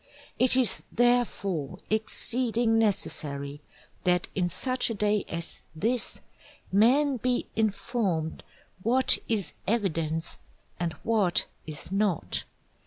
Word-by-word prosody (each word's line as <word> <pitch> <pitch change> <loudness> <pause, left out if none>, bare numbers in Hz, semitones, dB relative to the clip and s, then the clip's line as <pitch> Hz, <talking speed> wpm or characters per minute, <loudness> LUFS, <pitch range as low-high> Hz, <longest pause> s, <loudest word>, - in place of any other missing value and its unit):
It 255 0 +6
is 255 -4 +2
therefore 200 - +1
exceeding 225 +1 +1
necessary 145 -9 -1 0.4
that 180 -1 +2
in 180 -2 0
such 255 +9 0
a 230 - -2
day 210 0 +1
as 170 0 -6
this, 230 +8 -1 0.5
men 260 +8 +4
be 250 +1 0
informed 205 -6 -1 0.4
what 250 +5 +6
is 200 -9 -1
Evidence 165 -7 -1 0.4
and 170 -2 -1
what 210 -6 +2 0.2
is 155 +3 -7
not. 195 -4 0
210 Hz, 105 wpm, -28 LUFS, 170-240 Hz, 0.5 s, It